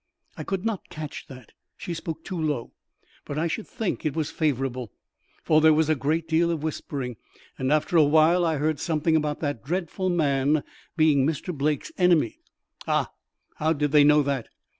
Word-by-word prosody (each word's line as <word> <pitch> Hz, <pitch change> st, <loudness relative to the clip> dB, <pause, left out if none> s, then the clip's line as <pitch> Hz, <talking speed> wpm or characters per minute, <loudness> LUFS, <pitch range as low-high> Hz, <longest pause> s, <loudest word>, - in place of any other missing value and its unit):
"I -, -, -6 dB
could 195 Hz, +1 st, -3 dB
not 225 Hz, -4 st, -3 dB
catch 155 Hz, -2 st, -7 dB
that; 130 Hz, -4 st, -12 dB, 0.3 s
she 175 Hz, -, -5 dB
spoke 160 Hz, -1 st, -6 dB
too 185 Hz, -4 st, -4 dB
low. 145 Hz, -7 st, -2 dB, 0.5 s
But 145 Hz, -, -6 dB
I 160 Hz, -, +1 dB
should 185 Hz, +6 st, -3 dB
think 225 Hz, -6 st, -3 dB
it 150 Hz, -3 st, -1 dB
was 155 Hz, -3 st, -2 dB
favourable, 130 Hz, -, -1 dB, 0.5 s
for 155 Hz, 0 st, +4 dB
there 155 Hz, 0 st, +6 dB
was 155 Hz, 0 st, +2 dB
a 155 Hz, -, +4 dB
great 155 Hz, +4 st, -1 dB
deal 165 Hz, +1 st, +2 dB
of 165 Hz, -3 st, -2 dB
whispering, 140 Hz, -6 st, -4 dB, 0.4 s
and 130 Hz, +1 st, 0 dB
after 155 Hz, +3 st, +2 dB
a 160 Hz, -, +7 dB
while 160 Hz, +4 st, +4 dB
I 160 Hz, -2 st, +1 dB
heard 155 Hz, 0 st, 0 dB
something 160 Hz, 0 st, +1 dB
about 150 Hz, -1 st, 0 dB
that 145 Hz, -7 st, -3 dB
dreadful 180 Hz, +4 st, -2 dB
man 145 Hz, -3 st, +2 dB, 0.3 s
being 155 Hz, -4 st, +4 dB
Mr. 160 Hz, +4 st, -2 dB
Blake's 150 Hz, +1 st, -1 dB
enemy." 180 Hz, -, +3 dB, 0.5 s
"Ah! -, -, +1 dB, 0.5 s
How 160 Hz, -1 st, +2 dB
did 145 Hz, -2 st, -1 dB
they 150 Hz, -1 st, +6 dB
know 150 Hz, 0 st, +5 dB
that?" 135 Hz, -4 st, -2 dB
155 Hz, 185 wpm, -25 LUFS, 145-165 Hz, 0.5 s, a